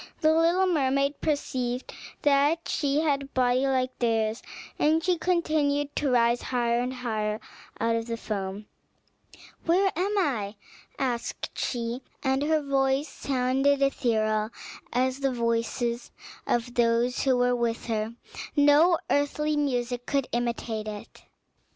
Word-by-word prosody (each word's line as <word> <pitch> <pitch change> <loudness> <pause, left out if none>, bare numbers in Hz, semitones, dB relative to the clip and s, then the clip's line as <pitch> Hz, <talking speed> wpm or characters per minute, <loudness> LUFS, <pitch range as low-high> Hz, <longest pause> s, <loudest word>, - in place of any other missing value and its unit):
The 315 0 +5
little 335 +4 +3
mermaid 275 -4 +1
perceived 255 -4 -2 0.3
that 290 +3 +3
she 290 0 +1
had 285 -3 +1
a - - -6
body 255 0 +2
like 255 -1 0
theirs, 225 -2 +1 0.4
and 305 +1 +4
that 325 - 0
she 365 0 +2
continued 300 -5 +1
to 290 - +1
rise 240 -1 +3
higher 240 -2 0
and 250 +1 -1
higher 220 -4 -2 0.4
out 230 0 +1
of 230 0 -2
the 230 0 -3
foam. 200 -2 -4 1.0
"Where 375 +3 +3
am 395 +5 0
I?" 225 - 0 0.4
asked 245 -4 -3
she, 240 0 -2 0.2
and 265 0 +1
her 310 +1 +1
voice 270 +1 +1
sounded 270 +2 +1
ethereal, 215 -5 +1 0.4
as 255 +2 0
the 275 -1 +1
voice 230 0 -1 0.6
of 240 0 0
those 240 +1 +2
who 260 -2 +3
were 245 0 +3
with 235 -1 -1
her; 225 0 -2 0.4
no 295 +4 +5
earthly 300 +1 +1
music 245 -4 -1
could 275 -2 +1
imitate 235 -2 -2
it. 210 -1 -9
255 Hz, 135 wpm, -27 LUFS, 235-290 Hz, 1.0 s, The